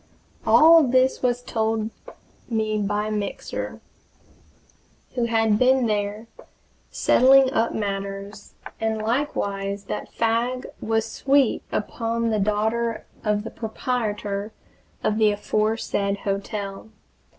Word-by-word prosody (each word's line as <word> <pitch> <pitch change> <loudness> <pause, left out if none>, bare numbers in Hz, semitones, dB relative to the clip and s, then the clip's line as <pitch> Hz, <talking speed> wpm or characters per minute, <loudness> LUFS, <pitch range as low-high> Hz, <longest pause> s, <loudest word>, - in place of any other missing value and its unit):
All 330 +1 +8
this 260 -1 +2
was 245 -1 0
told 220 -1 -1 0.6
me 215 -2 0
by 210 +1 -1
Mixer, 205 -2 -4 1.3
who 240 -2 0
had 225 -2 +2
been 255 0 +4
there, 210 0 -1 0.6
settling 265 +1 +5
up 230 -1 +1
matters, 200 0 -5 0.2
and 220 -1 0
likewise 205 -5 -2
that - - -5
Fagg 235 +3 0 0.2
was 225 0 0
sweet 275 +1 +2
upon 230 +1 -1
the 215 - +1
daughter 220 +3 0 0.2
of 210 -1 0
the 225 - -7
proprietor 215 -3 -3 0.5
of 215 +1 +1
the 215 -1 +5
aforesaid 205 -1 -1
hotel. 200 +1 -4
220 Hz, 105 wpm, -24 LUFS, 205-235 Hz, 1.3 s, All